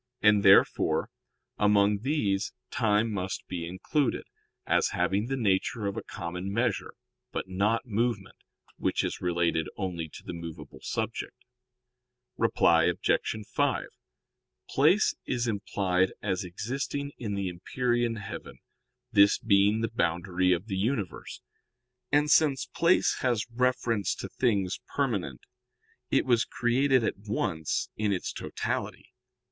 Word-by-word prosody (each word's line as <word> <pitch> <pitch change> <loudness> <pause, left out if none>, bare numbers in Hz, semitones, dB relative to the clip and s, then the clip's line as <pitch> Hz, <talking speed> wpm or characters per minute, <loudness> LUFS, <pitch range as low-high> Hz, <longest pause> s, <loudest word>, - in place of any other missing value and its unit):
And, 105 -1 +6
therefore, 95 -1 +4 0.5
among 105 0 +4
these 110 -7 0 0.2
time 110 +1 +2
must 95 -1 -4
be 85 -2 -4
included, 120 - -1 0.4
as - - +3
having 95 +5 +1
the 135 +1 -2
nature 105 -1 0
of 100 0 -2
a - - -3
common 90 +1 -5
measure; 115 0 -1 0.4
but - - -4
not 105 +6 0
movement, 115 -3 -1 0.4
which - - 0
is - - -3
related 85 -3 +1
only 85 -5 -3
to - - -12
the - - -6
movable 85 -1 -8
subject. - - -3 1.0
Reply 80 -1 +3
Obj. 100 +4 0
5: - - 0 0.8
Place 165 +10 +4
is 120 -2 -1
implied 95 -3 0
as 95 -3 -2
existing 135 +10 -4
in 105 -4 -3
the 100 -1 -2
empyrean 120 +6 -1
heaven, 105 -3 -8 0.5
this 100 -2 +6
being 105 0 +3
the 115 - -1
boundary 90 +2 +1
of 90 +2 +1
the 100 -4 -3
universe. 105 -1 -3 0.7
And 150 +1 +3
since 145 -4 +4
place 170 +2 +2
has 120 -4 +1
reference 120 -4 0
to - - -6
things 100 -7 0 0.2
permanent, 100 - -1 0.7
it - - +2
was 120 -2 +3
created 130 +1 +2
at - - -1
once 100 -7 -2
in 105 -1 0
its 95 - -2
totality. - - -4
105 Hz, 125 wpm, -28 LUFS, 95-120 Hz, 1.0 s, And